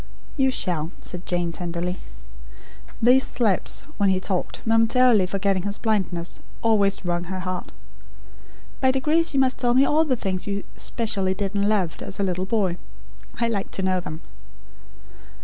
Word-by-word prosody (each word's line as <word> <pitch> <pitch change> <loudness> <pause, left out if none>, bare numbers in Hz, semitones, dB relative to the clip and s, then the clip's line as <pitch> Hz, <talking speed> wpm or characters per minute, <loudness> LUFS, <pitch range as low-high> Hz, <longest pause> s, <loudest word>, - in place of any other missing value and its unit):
"You 270 -2 +3
shall," 170 -10 -1
said 180 0 -7
Jane, 175 -1 0
tenderly. 175 +1 -3 1.0
These 255 +3 +5
slips 215 -6 0 0.2
when 200 -2 +3
he 190 -1 +2
talked, 185 -1 -3
momentarily 225 -2 +4
forgetting 195 0 0
his 205 +2 -2
blindness, 190 -6 -1 0.2
always 200 -4 +2
wrung 175 0 -1
her 185 +1 -4
heart. 185 -1 -4 1.1
"By 260 - +3
degrees 300 +4 +2
you - - +4
must 260 -1 +2
tell 245 -1 +2
me 270 +2 +6
all 310 +3 +3
the 280 -5 +1
things 190 -5 -3
you 200 0 -2
specially 200 -5 -1
did 195 0 -2
and 200 0 +1
loved, 190 -6 0
as 195 - -5
a - - +2
little 185 0 -1
boy. 195 -5 +1 0.6
I 235 - +2
like 205 -4 -2
to 190 - -1
know 185 -1 +2
them. 160 -2 -7
200 Hz, 160 wpm, -24 LUFS, 185-230 Hz, 1.1 s, me